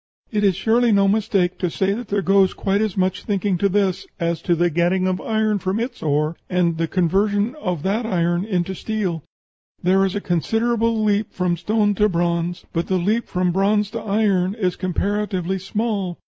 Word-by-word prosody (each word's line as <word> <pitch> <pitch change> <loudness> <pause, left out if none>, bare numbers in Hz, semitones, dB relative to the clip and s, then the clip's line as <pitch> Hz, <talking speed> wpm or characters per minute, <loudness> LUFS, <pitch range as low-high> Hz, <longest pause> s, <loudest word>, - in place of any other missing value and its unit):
It 210 -2 0
is 195 -3 +3
surely 230 +5 +2
no 200 -1 +4
mistake 195 -3 +1
to 180 - 0
say 190 +4 0
that 235 +2 -5
there 200 -1 -1
goes 195 0 +3
quite 200 +1 0
as 215 -4 -1
much 185 0 0
thinking 200 -1 0
to 200 - +2
this 195 -2 0
as 170 -1 -1
to 175 - +1
the 175 +1 +1
getting 175 +3 +1
of 185 -1 -1
iron 215 -1 0
from 190 +3 -1
its 240 +2 -4
ore, 150 +1 0
and 170 -3 +1
the 165 - +1
conversion 200 +6 +1
of 180 -6 -2
that 205 +5 0
iron 175 -3 +1
into 190 -3 -1
steel. 190 -5 -3 0.6
There 190 +2 +3
is 195 0 -1
a - - 0
considerable 225 +5 0
leap 210 0 +1
from 180 -1 0
stone 210 +4 +1
to 210 +1 +2
bronze, 170 0 -1
but 165 0 -1
the 190 - +1
leap 210 +7 0
from 180 0 0
bronze 200 +3 +1
to - - -4
iron 200 -3 +1
is 185 -5 -1
comparatively 190 0 -1
small.... 195 -2 -2
195 Hz, 190 wpm, -21 LUFS, 175-210 Hz, 0.6 s, no